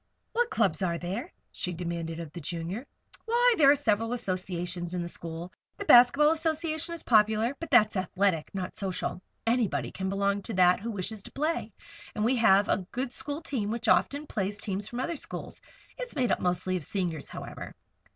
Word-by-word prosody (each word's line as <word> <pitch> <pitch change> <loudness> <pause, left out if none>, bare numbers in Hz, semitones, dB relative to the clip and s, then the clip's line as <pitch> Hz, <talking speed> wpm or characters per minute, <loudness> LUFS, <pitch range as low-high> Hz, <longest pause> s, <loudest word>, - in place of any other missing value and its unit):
"What 480 0 +2
clubs 195 - +1
are 170 -3 0
there?" 195 - -4 0.2
she 180 -3 -3
demanded 170 -1 -4
of 165 -3 -7
the 175 - -7
Junior. 170 - -4 0.4
"Why, 485 +2 +4
there 285 -7 +6
are 285 - +7
several 225 -2 +1
associations 180 -5 -3
in 175 - -1
the - - -4
school. 170 +1 -6 0.2
The - - -5
Basket 245 +2 +8
Ball 300 +1 +6
Association 320 0 0
is 335 - -6
popular; 220 +2 +3
but 330 - -6
that's 215 -5 +5
athletic, 185 -3 0
not 185 -2 -4
social. 185 -2 -3 0.2
Anybody 230 -2 +1
can 190 0 -3
belong 200 +1 0
to 215 +1 -5
that 180 -1 +5
who 225 +3 -5
wishes 205 0 -4
to - - -12
play. 300 -6 -1 0.4
And 215 -1 0
we 250 +2 +3
have 205 -3 +5
a 185 -2 0
good 250 0 -3
school 290 +4 -3
team 235 -10 -2
which 235 +1 -2
often 285 +6 +3
plays 200 -5 -2
teams 200 0 -3
from 240 - -5
other 330 +5 -2
schools. - - -7 0.4
It's - - -5
made 255 -4 +1
up - - +2
mostly 180 +1 0
of 175 - -6
Seniors, 170 -4 -3
however." - - -8
205 Hz, 190 wpm, -28 LUFS, 180-255 Hz, 0.4 s, Basket